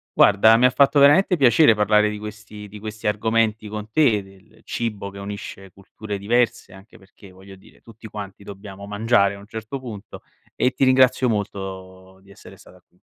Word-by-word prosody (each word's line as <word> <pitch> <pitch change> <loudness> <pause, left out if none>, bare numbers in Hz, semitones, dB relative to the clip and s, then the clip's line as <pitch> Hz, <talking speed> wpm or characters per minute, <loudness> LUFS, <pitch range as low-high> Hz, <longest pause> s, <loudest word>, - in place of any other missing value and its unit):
Guarda 110 +2 +5
mi 125 - +3
ha - - +6
fatto 140 +2 +3
veramente 150 +7 +5
piacere 135 -2 +5
parlare 105 0 +2
di 105 - -7
questi 105 0 -10
di 105 +1 -12
questi 110 +1 -7
argomenti 110 +1 0
con 105 +1 -7
te, 110 -5 +2
del 95 +3 -20
cibo 105 -4 -5
che 100 - -13
unisce 100 -1 -9
culture 100 +2 -9
diverse 115 -2 -1
anche 95 +4 -17
perché, 95 0 -18
voglio 95 +1 -15
dire, 95 - -21
tutti 115 -1 -14
quanti 100 -2 -9
dobbiamo 100 0 -11
mangiare 105 -1 +1
a 100 - -11
un 100 - -15
certo 115 +4 -7
punto 110 -6 -10 0.3
e 125 - +1
ti 135 - -1
ringrazio 130 0 +3
molto 95 -3 -6
di 100 - -23
essere 100 - -15
stata - - -19
qui. - - -35
105 Hz, 185 wpm, -21 LUFS, 100-115 Hz, 0.3 s, ha